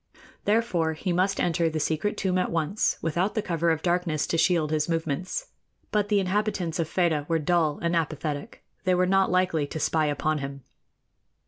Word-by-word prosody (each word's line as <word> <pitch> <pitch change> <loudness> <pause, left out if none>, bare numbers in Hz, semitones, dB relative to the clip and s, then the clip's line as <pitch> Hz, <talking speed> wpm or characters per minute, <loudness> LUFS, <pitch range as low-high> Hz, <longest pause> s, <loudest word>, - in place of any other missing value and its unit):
Therefore, 200 -7 +1
he 175 +3 -2
must 190 +3 +1
enter 165 -1 +1
the 155 0 -2
secret 160 +7 -1
tomb 185 -1 +1
at - - 0
once, 170 +5 0
without 175 +5 0
the 215 - +1
cover 170 -1 0
of 160 -1 0
darkness 175 -4 +1
to - - -2
shield 165 -4 +2
his 155 +1 0
movements; 165 - -2 0.4
but 205 -1 +1
the 205 -2 +3
inhabitants 190 -3 -1
of 160 -2 -1
Fedah 160 -5 +1
were 165 - +3
dull 160 -1 +1
and 170 0 +1
apathetic 155 -2 -3 0.2
they 185 -1 +3
were 180 +1 +3
not 195 +1 +3
likely 180 -5 +1
to 160 - -5
spy 155 +1 +1
upon 150 +1 0
him. 140 -1 -6
170 Hz, 185 wpm, -26 LUFS, 155-185 Hz, 0.4 s, the